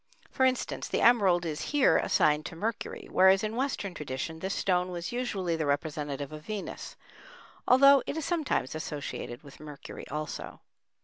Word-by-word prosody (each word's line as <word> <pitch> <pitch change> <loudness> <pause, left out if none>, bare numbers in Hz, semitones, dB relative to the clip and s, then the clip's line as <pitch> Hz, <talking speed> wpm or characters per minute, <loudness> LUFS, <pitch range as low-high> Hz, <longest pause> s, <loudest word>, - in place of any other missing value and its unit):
For 260 -1 +3
instance, 255 0 -2
the - - -1
emerald 195 -7 +4
is 155 -2 -3
here 285 - +5
assigned 150 0 +2
to - - -9
Mercury, 220 +7 -4
whereas 190 +1 +5
in 215 +1 -2
Western 245 -7 -2
tradition 150 +2 -5
this 190 +3 -3
stone 180 -1 +1
was 175 -1 -5
usually 200 -9 -1
the 160 -2 -2
representative 145 -1 -2
of 155 0 -9
Venus, 210 0 -6 0.7
although 275 +2 +7
it 300 - -3
is 315 - -3
sometimes 315 - -1
associated 145 -5 -5
with 140 -2 -14
Mercury 150 -2 -9
also. 150 +1 -6
175 Hz, 160 wpm, -29 LUFS, 150-230 Hz, 0.7 s, although